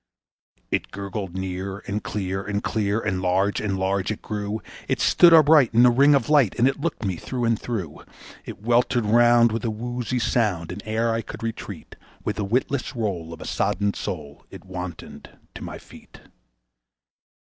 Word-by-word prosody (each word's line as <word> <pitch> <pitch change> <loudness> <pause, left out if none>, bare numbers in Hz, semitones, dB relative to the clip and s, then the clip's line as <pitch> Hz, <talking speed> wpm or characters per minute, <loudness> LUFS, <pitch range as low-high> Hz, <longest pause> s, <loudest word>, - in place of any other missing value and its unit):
It - - -1
gurgled 100 -2 -6
near, 95 +1 -4
and 105 +1 -3
clear 95 -1 -3
and 105 0 -3
clear 105 -1 0
and 95 -4 -2
large 95 +2 +1
and 100 -3 -1
large 95 0 0
it 105 - -6
grew; 105 0 -3 0.3
It - - 0
stood 175 - +6
upright 150 -7 +6
in 120 +2 +7
a 125 - +6
ring 140 +4 +5
of 130 -5 +1
light 145 -9 +4
and 120 - +4
it 135 - -1
looked 150 -8 -3
me 95 -3 -1
through 125 +7 -3
and 115 -1 +1
through. 100 -11 -5 0.4
It 100 - -10
weltered 120 0 +2
round 120 +1 +5
with 115 - -3
a 115 - 0
woozy 120 +3 -3
sound, 105 -9 0
and 95 +3 -6
ere 115 +1 0
I 115 - -1
could - - -9
retreat, 115 -1 -6 0.3
With - - -2
the 105 - -1
witless 125 +6 -1
roll 95 -8 -3
of 85 - -9
a - - -7
sodden 100 +1 0
soul 75 -5 -6
it - - -12
wantoned 90 -3 -8 0.2
to - - -9
my - - -6
feet. - - -16
105 Hz, 180 wpm, -24 LUFS, 95-120 Hz, 0.4 s, in